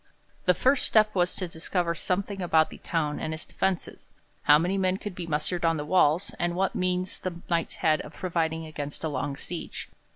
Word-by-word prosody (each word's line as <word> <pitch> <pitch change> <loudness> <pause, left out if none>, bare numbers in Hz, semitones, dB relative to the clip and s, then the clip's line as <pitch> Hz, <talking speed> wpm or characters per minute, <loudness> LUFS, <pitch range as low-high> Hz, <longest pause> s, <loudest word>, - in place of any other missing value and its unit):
The 180 - +5
first 265 +6 +3
step 215 -1 +4
was 180 -1 +1
to 185 - -3
discover 170 +1 -1
something 195 +4 -2
about 160 -3 +3
the - - -10
town 150 -3 -1
and 155 - -2
its 155 - -7
defences: 190 -2 -2 0.3
how 150 0 +7
many 175 +5 0
men 190 -1 +1
could 205 -1 -6
be 175 -1 -6
mustered 165 +3 -1
on 165 -1 +3
the 150 - -3
walls, 170 +2 +3
and 175 0 0
what 190 +1 +1
means 185 0 -1
the 185 -2 -4 0.2
Knights 165 -1 0
had 155 -1 +2
of 150 - -11
providing 165 -3 -1
against 145 -1 -6
a 160 - 0
long 140 0 -2
siege. 175 -1 -6
175 Hz, 200 wpm, -27 LUFS, 160-185 Hz, 0.3 s, how